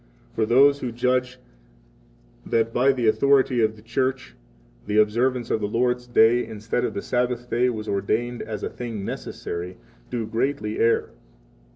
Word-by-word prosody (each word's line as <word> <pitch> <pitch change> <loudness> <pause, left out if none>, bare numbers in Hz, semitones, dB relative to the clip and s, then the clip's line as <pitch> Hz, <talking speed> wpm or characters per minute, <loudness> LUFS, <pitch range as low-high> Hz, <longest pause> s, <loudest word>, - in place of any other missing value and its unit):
For 110 -1 0
those 140 +4 +5
who 125 -3 -4
judge 125 +1 0 1.1
that 115 0 0
by 130 +3 +4
the 125 -3 -2
authority 130 +1 +3
of 110 0 +1
the 105 - -17
Church 130 +3 -2 0.5
the 105 - 0
observance 120 +3 +2
of 110 - 0
the 105 - 0
Lord's 125 +3 0
Day 120 0 +4
instead 110 +2 -3
of - - -2
the 100 - -3
Sabbath 125 0 -1
day 125 +2 +2
was 110 -3 -5
ordained 115 +5 -1
as 110 -2 -6
a - - -2
thing 115 -5 -6
necessary, 90 -1 -5
59 - - -25 0.3
do 120 -2 -3
greatly 110 -1 -2
err. 115 0 +2
120 Hz, 165 wpm, -24 LUFS, 110-125 Hz, 1.1 s, those